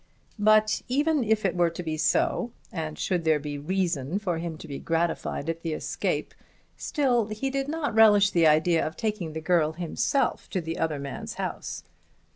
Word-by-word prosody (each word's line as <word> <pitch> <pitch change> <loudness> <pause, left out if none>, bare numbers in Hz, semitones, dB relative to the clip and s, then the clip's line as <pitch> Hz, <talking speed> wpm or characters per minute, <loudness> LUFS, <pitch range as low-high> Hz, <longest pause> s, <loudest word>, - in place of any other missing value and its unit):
But, 215 +1 +4
even 295 +5 +2 0.4
were 175 -1 +3
it 170 - -5
to 180 - -4
be 160 -2 -2
so, 245 - +1 0.2
and 160 -3 -4
should 180 -3 -1
there 160 -1 +3
be 145 0 -5
reason 170 -2 -1
for 180 -6 -2
him 165 -1 -4
to - - -10
be 140 - -6
gratified 165 -2 -1
at 165 0 -3
the 165 -2 -2
escape, - - -2 0.4
still 250 -7 +1
he 220 +5 -3
did 275 0 -1
not 305 -3 -2
relish 205 -2 +6
the 170 -2 +4
idea 160 +2 +4
of 155 - -4
taking 210 -8 -2
the 160 - -4
girl 160 -1 +2
himself 180 - -1
to 190 - -1
the 165 -1 -4
other 160 -2 0
man's 140 0 -6
house. - - -5
175 Hz, 180 wpm, -27 LUFS, 160-215 Hz, 0.4 s, relish